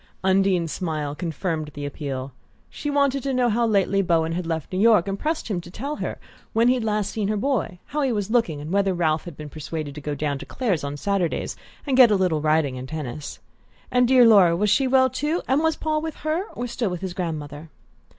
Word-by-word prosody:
Undine's 190 Hz, -3 st, +2 dB
smile 155 Hz, -5 st, -3 dB
confirmed 160 Hz, -1 st, -3 dB
the 145 Hz, 0 st, -5 dB
appeal. 135 Hz, -2 st, -5 dB, 0.4 s
She 295 Hz, -, -4 dB
wanted 280 Hz, -1 st, +2 dB
to 270 Hz, -1 st, -2 dB
know 250 Hz, -1 st, +3 dB
how 235 Hz, +1 st, +2 dB
lately 195 Hz, -2 st, +2 dB
Bowen 165 Hz, -3 st, +1 dB
had 170 Hz, 0 st, -3 dB
left 160 Hz, 0 st, -3 dB
New 185 Hz, -, 0 dB
York, 215 Hz, -4 st, +5 dB
and 195 Hz, 0 st, -3 dB
pressed 315 Hz, +1 st, -2 dB
him 195 Hz, -6 st, -2 dB
to 170 Hz, -, -12 dB
tell 275 Hz, +11 st, -5 dB
her -, -, -4 dB, 0.4 s
when 230 Hz, +2 st, +4 dB
he -, -, +5 dB
had 250 Hz, -3 st, -2 dB
last 210 Hz, -2 st, 0 dB
seen 210 Hz, -3 st, -2 dB
her 215 Hz, +1 st, 0 dB
boy, 220 Hz, -6 st, -1 dB
how 300 Hz, -, -3 dB
he 270 Hz, -3 st, +1 dB
was 210 Hz, -2 st, -2 dB
looking, 225 Hz, -11 st, +1 dB
and 150 Hz, +3 st, -6 dB
whether 195 Hz, -1 st, +2 dB
Ralph 160 Hz, -2 st, 0 dB
had 170 Hz, -4 st, -9 dB
been 150 Hz, -, -7 dB
persuaded 155 Hz, 0 st, -6 dB
to 150 Hz, -, -8 dB
go 145 Hz, +1 st, -3 dB
down 145 Hz, -1 st, -2 dB
to -, -, -8 dB
Clare's 205 Hz, -, -1 dB
on 140 Hz, 0 st, -4 dB
Saturdays 190 Hz, 0 st, -1 dB, 0.3 s
and 275 Hz, -3 st, +1 dB
get 255 Hz, -2 st, +8 dB
a 210 Hz, -, +3 dB
little 180 Hz, -5 st, +1 dB
riding 155 Hz, -4 st, +1 dB
and 130 Hz, +1 st, -8 dB
tennis? 150 Hz, -2 st, -5 dB, 0.5 s
And 250 Hz, -1 st, +4 dB
dear 255 Hz, -1 st, +6 dB
Laura 195 Hz, -7 st, +6 dB
was 205 Hz, +3 st, +1 dB
she 270 Hz, -, +3 dB
well 260 Hz, 0 st, +5 dB
too, 300 Hz, +6 st, -2 dB
and 270 Hz, +3 st, +2 dB
was 320 Hz, -1 st, +2 dB
Paul 310 Hz, -1 st, -1 dB
with 320 Hz, -1 st, -4 dB
her, 320 Hz, +5 st, 0 dB
or 245 Hz, -, -3 dB
still 235 Hz, -3 st, -2 dB
with 180 Hz, -2 st, -5 dB
his 190 Hz, -2 st, -4 dB
grandmother? 155 Hz, -3 st, -5 dB
190 Hz, 230 wpm, -24 LUFS, 155-245 Hz, 0.5 s, get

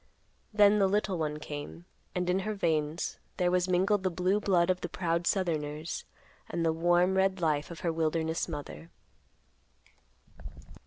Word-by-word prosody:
Then 210 Hz, 0 st, +5 dB
the 195 Hz, -, +4 dB
little 195 Hz, -2 st, 0 dB
one 150 Hz, -1 st, -1 dB
came, 150 Hz, +3 st, -7 dB, 0.3 s
and 180 Hz, -1 st, -1 dB
in 180 Hz, +1 st, +2 dB
her 215 Hz, +2 st, -3 dB
veins 160 Hz, -3 st, -1 dB, 0.2 s
there 180 Hz, -1 st, +2 dB
was 180 Hz, 0 st, +2 dB
mingled 190 Hz, +3 st, +2 dB
the 185 Hz, -, +1 dB
blue 185 Hz, +3 st, +1 dB
blood 185 Hz, -3 st, +3 dB
of 185 Hz, -, -3 dB
the 175 Hz, -, -4 dB
proud 170 Hz, -1 st, -1 dB
southerners 155 Hz, -4 st, -1 dB, 0.4 s
and 170 Hz, -1 st, -1 dB
the 160 Hz, -, +2 dB
warm 175 Hz, +3 st, +3 dB
red 190 Hz, 0 st, +2 dB
life 150 Hz, -3 st, 0 dB
of 170 Hz, -, -9 dB
her 170 Hz, -2 st, 0 dB
wilderness 160 Hz, 0 st, 0 dB
mother. 155 Hz, +1 st, -7 dB
175 Hz, 155 wpm, -30 LUFS, 160-190 Hz, 0.4 s, Then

